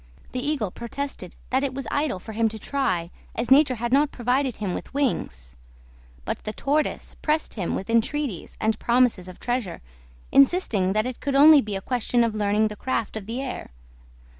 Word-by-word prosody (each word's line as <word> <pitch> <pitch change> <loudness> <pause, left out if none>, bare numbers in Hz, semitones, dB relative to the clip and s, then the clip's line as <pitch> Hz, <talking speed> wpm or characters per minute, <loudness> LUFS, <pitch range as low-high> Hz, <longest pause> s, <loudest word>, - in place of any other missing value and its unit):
The 255 0 -3
Eagle 280 -10 -1
protested 235 -5 -6 0.2
that 260 +2 +2
it 265 -2 -2
was 275 - -4
idle 285 -8 0
for 185 - -9
him 225 +1 +1
to 220 - -7
try, 205 -9 -1 0.2
as 230 +2 -3
nature 275 -1 +6
had 240 +2 -2
not 290 +2 +4
provided 250 0 0
him 200 -4 -3
with - - -6
wings; 65 - -2 0.7
but - - -4
the 215 - -4
Tortoise 295 +5 -1
pressed 310 +1 0
him 190 -6 -2
with 190 - -4
entreaties 230 - -1
and 220 0 0
promises 235 -6 +2
of 185 - -11
treasure, 240 -7 -2 0.5
insisting 255 - +4
that 215 +1 +1
it 255 -1 -5
could 280 -1 -2
only 295 +1 +8
be 210 -3 -4
a 195 - -3
question 245 +1 +1
of 230 -2 0
learning 210 +1 +1
the 210 - -7
craft 230 -2 -2
of 210 -2 -6
the 245 +4 -3
air. 260 - -6
240 Hz, 190 wpm, -25 LUFS, 210-275 Hz, 0.7 s, only